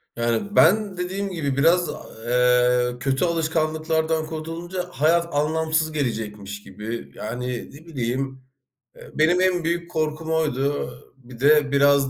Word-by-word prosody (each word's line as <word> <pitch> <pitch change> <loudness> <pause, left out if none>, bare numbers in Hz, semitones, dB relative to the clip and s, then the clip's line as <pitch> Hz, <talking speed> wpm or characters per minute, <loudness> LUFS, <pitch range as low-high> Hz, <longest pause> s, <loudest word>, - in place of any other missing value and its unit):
Yani, 120 - -1
ben 200 +1 +4
dediğim 190 +3 -3
gibi 145 -6 -2
biraz, 170 +3 +4 0.4
eee, 125 0 +3
kötü 135 +5 +1
alışkanlıklardan 160 -1 0
kurtulunca, 165 +3 -5
hayat 170 +1 +2
anlamsız 160 +1 +1
gelecekmiş 105 -7 -4
gibi. 110 +4 -7
Yani, 125 +3 -4 0.3
ne 150 +4 -14
bileyim, 130 -2 -3 0.5
eee, - - -13
benim 170 +4 +3
en 185 -2 +2
büyük 170 +1 -2
korkum 155 0 -2
oydu. 145 -3 0 0.3
Bir 125 -2 -14
de 145 +1 +4
biraz 140 -1 +4
155 Hz, 125 wpm, -23 LUFS, 130-165 Hz, 0.5 s, ben